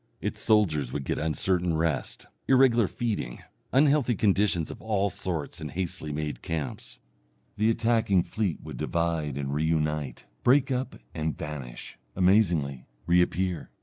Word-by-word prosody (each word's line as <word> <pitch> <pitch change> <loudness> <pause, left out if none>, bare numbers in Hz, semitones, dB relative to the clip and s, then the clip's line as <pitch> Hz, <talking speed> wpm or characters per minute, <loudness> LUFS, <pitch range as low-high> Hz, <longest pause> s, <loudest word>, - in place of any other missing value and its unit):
Its - - -4
soldiers 80 - +2
would 70 - -3
get - - -2
uncertain 85 +2 0
rest, 80 -1 -1 0.2
irregular 130 -5 +5
feeding, 105 - -3 0.3
unhealthy 140 -2 +4
conditions 100 -5 +2
of - - -10
all 100 -3 0
sorts 80 -4 -4
in 75 - -4
hastily 80 -1 -3
made 75 0 -4
camps. 80 -3 -5 0.6
The 110 +2 +2
attacking 115 -5 +2
fleet 105 -6 -2
would - - -8
divide 80 -4 -1
and 70 -1 -3
re 75 +2 0
unite, 75 -4 -1 0.2
break 135 +2 +4
up 130 +1 -2 0.2
and 80 0 -2
vanish, 70 -5 -7 0.2
amazingly 90 - +2 0.2
reappear. 90 -1 +1
85 Hz, 135 wpm, -27 LUFS, 75-110 Hz, 0.6 s, irregular